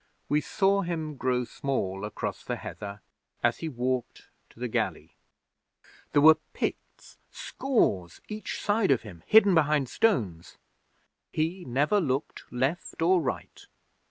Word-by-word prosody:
'We 150 +1 +3
saw 195 +5 +2
him 160 -4 -3
grow 125 -1 0
small 110 -6 -3
across 105 - -4
the - - -2
heather 100 -1 -7 0.4
as - - +2
he 160 - -3
walked 125 -2 -3 0.2
to - - -20
the - - -2
galley. - - -2 1.0
There 145 - +5
were 155 0 +8
Picts, - - -5
scores, 100 - 0
each 215 0 -5
side 205 0 +1
of 135 -4 +3
him, 90 -7 -11
hidden 210 -3 +7
behind 150 -5 +3
stones. 105 - 0 0.7
He 170 +4 -2
never 145 +11 +2
looked 140 -2 -3
left 135 +7 -2
or 180 +1 +4
right. 130 -5 -5
145 Hz, 130 wpm, -28 LUFS, 125-180 Hz, 1.0 s, were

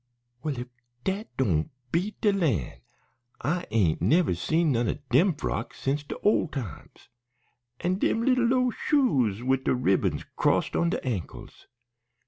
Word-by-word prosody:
"Well, 150 -4 -3
if 125 - -5 0.4
dat 195 +3 -2
doan' 85 -12 +1 0.2
beat 185 +6 -1
de 210 - +4
lan'. 110 - -1 0.6
I 175 +7 -1
ain't 95 -8 +2
never 165 - +3
seen 160 - +1
none 120 -2 +1
o' - - -1
dem 165 +7 +4
frocks - - -4
since 140 +2 0
de - - -6
ole 210 -3 +3
times. 125 - -8 0.7
An' 185 +2 0
dem 225 - +1
lil 250 -2 +3
low 250 0 +2
shoes 130 - +1
wid 130 +1 +1
de - - +2
ribbons 110 -6 +1
crossed - - +1
on 170 - +2
de - - -3
ankles! 110 -10 -5
145 Hz, 150 wpm, -27 LUFS, 120-190 Hz, 0.7 s, de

